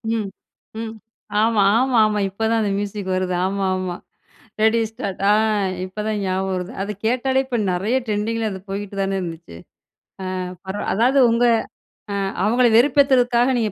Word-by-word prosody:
ம் 215 Hz, -3 st, -2 dB, 0.5 s
ம். 225 Hz, -1 st, -5 dB, 0.5 s
ஆமா, 220 Hz, -2 st, +3 dB
ஆமா, 255 Hz, 0 st, +2 dB
ஆமா. 210 Hz, -1 st, 0 dB
இப்ப 195 Hz, +3 st, -13 dB
தான் 230 Hz, 0 st, +2 dB
அந்த 205 Hz, -2 st, 0 dB
மியூசிக் 200 Hz, -1 st, -4 dB
வருது. 185 Hz, 0 st, -1 dB
ஆமா, 195 Hz, 0 st, -1 dB
ஆமா, 185 Hz, -1 st, -3 dB, 0.7 s
ரெடி 220 Hz, +1 st, +4 dB
ஸ்டார்ட் 195 Hz, -4 st, -6 dB
ஆ -, -, +6 dB, 0.5 s
இப்பதான் 210 Hz, +2 st, -3 dB
ஞாபகம் 190 Hz, +1 st, -1 dB
வருது. 180 Hz, +4 st, -4 dB
அத 205 Hz, -, -4 dB, 0.2 s
கேட்டாலே 260 Hz, +2 st, +1 dB
இப்ப 255 Hz, -2 st, -2 dB
நெறைய 200 Hz, +8 st, 0 dB
ட்ரெண்டிங்கில 220 Hz, +1 st, -1 dB
அது 190 Hz, -1 st, -6 dB
போயிட்டு 200 Hz, 0 st, -5 dB
தானே 195 Hz, 0 st, -1 dB
இருந்துச்சு. 165 Hz, -, -7 dB, 0.8 s
ஆ -, -, -3 dB, 0.3 s
பரவா 190 Hz, +2 st, -4 dB
அதாவது 250 Hz, +6 st, +3 dB
உங்க 235 Hz, +1 st, +2 dB, 0.7 s
அ -, -, -2 dB, 0.3 s
அவங்கள 240 Hz, +3 st, +4 dB
வெறுப்பேத்துறதுக்காக 255 Hz, -2 st, +4 dB
நீங்க 220 Hz, -3 st, 0 dB
210 Hz, 155 wpm, -21 LUFS, 190-235 Hz, 0.8 s, ஆ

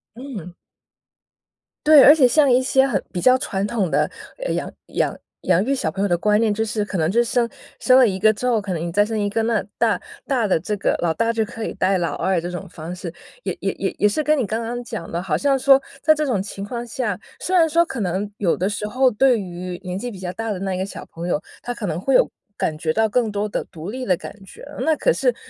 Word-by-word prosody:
嗯。 225 Hz, -, -8 dB, 1.3 s
对， 305 Hz, -2 st, +9 dB
而 290 Hz, -, +9 dB
且 275 Hz, -5 st, +5 dB
像 280 Hz, +2 st, +4 dB
一 245 Hz, -, +5 dB
些 265 Hz, +1 st, +3 dB
很 205 Hz, -8 st, 0 dB
比 180 Hz, -, -2 dB
较 255 Hz, +4 st, +5 dB
传 195 Hz, -5 st, -2 dB
统 205 Hz, -6 st, -1 dB
的 -, -, +2 dB, 0.5 s
养 -, -, -3 dB, 0.2 s
养 -, -, -1 dB, 0.3 s
养 180 Hz, +1 st, +2 dB
育 275 Hz, +5 st, 0 dB
小 265 Hz, -, -1 dB
朋 195 Hz, -, -4 dB
友 205 Hz, -, +2 dB
的 175 Hz, -2 st, +1 dB
观 210 Hz, +4 st, +2 dB
念。 225 Hz, -2 st, +2 dB
就 220 Hz, +2 st, 0 dB
是 210 Hz, -1 st, -1 dB
可 205 Hz, -2 st, -4 dB
能 160 Hz, -1 st, +1 dB
就 235 Hz, +2 st, +3 dB
是 -, -, -6 dB
生 240 Hz, -1 st, +2 dB, 0.3 s
生 255 Hz, -, +4 dB
了 250 Hz, -, +6 dB
1 190 Hz, -3 st, -1 dB
个 215 Hz, +3 st, +4 dB
之 250 Hz, +4 st, -3 dB
后， 235 Hz, -3 st, +3 dB
可 195 Hz, -3 st, -4 dB
能 160 Hz, -, -3 dB
你 170 Hz, 0 st, -3 dB
再 205 Hz, +4 st, +3 dB
生 220 Hz, +1 st, -3 dB
1 205 Hz, -1 st, 0 dB
个 225 Hz, +2 st, 0 dB
那 225 Hz, -2 st, +1 dB
大 -, -, +1 dB, 0.2 s
大 250 Hz, -6 st, +1 dB
的 185 Hz, -, +2 dB
这 210 Hz, +6 st, -3 dB
个 -, -, +1 dB
老 165 Hz, -2 st, +2 dB
大 230 Hz, +6 st, +1 dB
就 225 Hz, -1 st, 0 dB
可 225 Hz, +1 st, -7 dB
以 -, -, -4 dB
带 185 Hz, 0 st, +1 dB
老 170 Hz, -, -1 dB
二 185 Hz, 0 st, 0 dB
这 175 Hz, -, -4 dB
种 180 Hz, +2 st, -6 dB
方 165 Hz, 0 st, -7 dB
式， 175 Hz, -2 st, -7 dB, 0.3 s
也 -, -, -3 dB
也 -, -, 0 dB
也 -, -, -3 dB
也 210 Hz, -, +4 dB
是 300 Hz, +9 st, -1 dB
跟 305 Hz, +1 st, +3 dB
你 260 Hz, -7 st, -1 dB
刚 225 Hz, +3 st, -2 dB
刚 240 Hz, +2 st, -4 dB
讲 170 Hz, -7 st, -6 dB
的， 170 Hz, -, -2 dB
好 165 Hz, -5 st, -1 dB
像 275 Hz, +7 st, +2 dB
说 270 Hz, +1 st, +6 dB, 0.2 s
在 310 Hz, -1 st, +5 dB
这 305 Hz, 0 st, -1 dB
种 240 Hz, -9 st, 0 dB
情 200 Hz, 0 st, -6 dB
况 235 Hz, +3 st, -5 dB
下， 220 Hz, -5 st, -2 dB, 0.2 s
虽 370 Hz, -, -1 dB
然 330 Hz, -3 st, +5 dB
说 335 Hz, +2 st, +3 dB
可 265 Hz, -7 st, -6 dB
能 190 Hz, +1 st, -1 dB
有 185 Hz, -5 st, +1 dB
的 185 Hz, -, 0 dB
时 210 Hz, 0 st, -3 dB
候 255 Hz, +3 st, +3 dB
对 250 Hz, +1 st, +3 dB
于 180 Hz, -1 st, -6 dB
年 180 Hz, -1 st, -4 dB
纪 245 Hz, -, -4 dB
比 210 Hz, -, -9 dB
较 185 Hz, -1 st, -5 dB
大 225 Hz, +1 st, -3 dB
的 200 Hz, -, -2 dB
那 190 Hz, -1 st, -2 dB
一 185 Hz, -, -3 dB
个 190 Hz, -, -1 dB
小 -, -, -8 dB
朋 170 Hz, +1 st, -7 dB
友， 175 Hz, -, +1 dB, 0.2 s
他 245 Hz, -, -4 dB
可 235 Hz, -3 st, -5 dB
能 165 Hz, -2 st, -2 dB
会 270 Hz, +6 st, +2 dB
有 -, -, +5 dB, 0.3 s
感 155 Hz, -, -1 dB
觉 155 Hz, 0 st, -1 dB
到 220 Hz, +3 st, +2 dB
更 230 Hz, +1 st, +1 dB
多 210 Hz, 0 st, -2 dB
的 -, -, -2 dB
独 165 Hz, +1 st, -9 dB
立 255 Hz, +2 st, -5 dB
的 185 Hz, -, +3 dB
感 -, -, -9 dB
觉。 -, -, -14 dB, 0.2 s
那 320 Hz, 0 st, +2 dB
可 -, -, +2 dB
是 -, -, +1 dB
210 Hz, 285 characters per minute, -21 LUFS, 185-250 Hz, 1.3 s, 对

